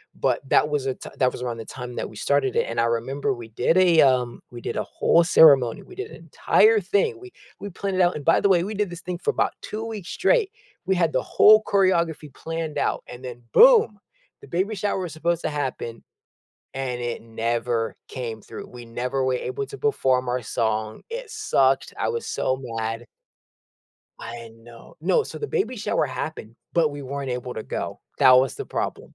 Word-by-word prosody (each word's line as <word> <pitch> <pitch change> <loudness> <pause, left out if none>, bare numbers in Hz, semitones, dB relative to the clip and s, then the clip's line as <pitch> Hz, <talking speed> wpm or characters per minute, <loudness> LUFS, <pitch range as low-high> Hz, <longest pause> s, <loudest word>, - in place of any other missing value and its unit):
but - - +1
that 150 - +4
was 145 -2 -1
a 130 - -1
t - - -10
that 130 - +4
was - - -8
around 120 -2 -3
the 115 - -7
time 125 0 -8
that - - -3
we 110 - -14
started 140 -1 +1
it, - - +1
and 115 - -2
I - - +2
remember 125 +5 -1
we 120 -2 -9
did 120 +8 +1
a, 175 -3 +5
um 125 -3 +2
we 120 -1 -9
did - - -4
a - - 0
whole 170 - +3
ceremony, 140 -8 +6
we 370 - -14
did 400 +3 -5
an - - -9
entire 440 0 +3
thing. 425 -1 0
We 375 0 -12 0.3
we 200 +1 -6
planned 195 +1 -3
it - - +3
out, 175 0 +3
and 145 - -5
by 165 - +5
the - - +3
way, 175 -2 +4
we 210 +3 -4
did 205 -1 -1
this 175 0 -8
thing 180 -1 -4
for 445 - 0
about - - 0
2 215 +1 -5
weeks 215 -6 -6
straight. 410 +1 +2 0.3
We 190 0 +1
had 170 -3 +2
the - - +2
whole 215 +1 +6
choreography 170 -7 +1
planned 165 0 -5
out - - -1
and 125 +1 -10
then 120 -1 -8
boom, 450 - +6 0.4
the - - -13
baby 190 +5 -1
shower 200 0 -1
was 175 -3 -5
supposed 170 +1 -1
to - - 0
happen, 130 -5 -4 0.7
and 130 -2 -3
it 120 -1 -4
never 115 0 -2
came 115 -4 -5
through, - - -9
we 120 -1 -11
never 125 +3 -2
were 130 0 +1
able 415 - -3
to 420 - -9
perform 130 - +1
our 125 0 -1
song, 110 -1 -2
it 485 0 -6
sucked, - - +1
I - - 0
was 465 -1 -3
so 130 - 0
mad. 115 -1 -4 1.2
I 115 0 -8
know 115 0 -15
No, 470 - +2
so, - - -8
the 435 - -3
baby 400 - -1
shower 205 -7 0
happened, 130 -3 -6 0.2
but 165 -3 +3
we 145 0 -7
weren't 135 0 -4
able 125 0 -4
to 110 - -5
go, - - -5 0.2
that 130 - +7
was 130 -1 +4
the - - -6
problem. - - -4
140 Hz, 210 wpm, -24 LUFS, 120-190 Hz, 1.2 s, that